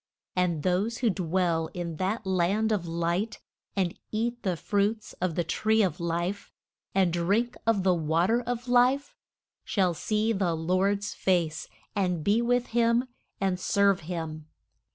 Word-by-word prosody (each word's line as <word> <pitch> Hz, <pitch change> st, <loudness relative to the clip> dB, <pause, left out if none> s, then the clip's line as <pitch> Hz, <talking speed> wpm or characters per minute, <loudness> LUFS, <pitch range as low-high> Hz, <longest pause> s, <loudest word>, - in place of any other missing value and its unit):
And 175 Hz, -5 st, +1 dB
those 195 Hz, +6 st, +1 dB
who 235 Hz, -4 st, +2 dB
dwell 170 Hz, -3 st, 0 dB
in 170 Hz, -3 st, -4 dB
that 195 Hz, +6 st, -1 dB
land 190 Hz, +4 st, +1 dB
of 190 Hz, -5 st, 0 dB
light, 170 Hz, +6 st, -1 dB, 0.4 s
and 185 Hz, -3 st, -1 dB
eat 235 Hz, +2 st, -1 dB
the 185 Hz, -3 st, -1 dB
fruits 205 Hz, +5 st, -1 dB
of 180 Hz, -3 st, 0 dB
the 175 Hz, -, +1 dB
tree 220 Hz, +7 st, +2 dB
of 190 Hz, -1 st, -1 dB
life, 170 Hz, +3 st, -2 dB, 0.4 s
and 185 Hz, -3 st, +3 dB
drink 205 Hz, +8 st, +1 dB
of 215 Hz, -4 st, +3 dB
the 185 Hz, -1 st, +4 dB
wa 165 Hz, 0 st, +1 dB
ter 230 Hz, +4 st, +2 dB
of 245 Hz, 0 st, -4 dB
life, 250 Hz, +3 st, +3 dB, 0.5 s
shall 185 Hz, -4 st, +1 dB
see 215 Hz, +6 st, 0 dB
the 185 Hz, -5 st, 0 dB
Lord's 195 Hz, +5 st, 0 dB
face 170 Hz, -4 st, 0 dB, 0.3 s
and 180 Hz, -5 st, 0 dB
be 210 Hz, +6 st, +3 dB
with 245 Hz, +1 st, +1 dB
him 235 Hz, +2 st, +3 dB, 0.3 s
and 190 Hz, -2 st, 0 dB
serve 200 Hz, 0 st, +3 dB
him. 160 Hz, -2 st, -5 dB
190 Hz, 155 wpm, -28 LUFS, 170-220 Hz, 0.5 s, the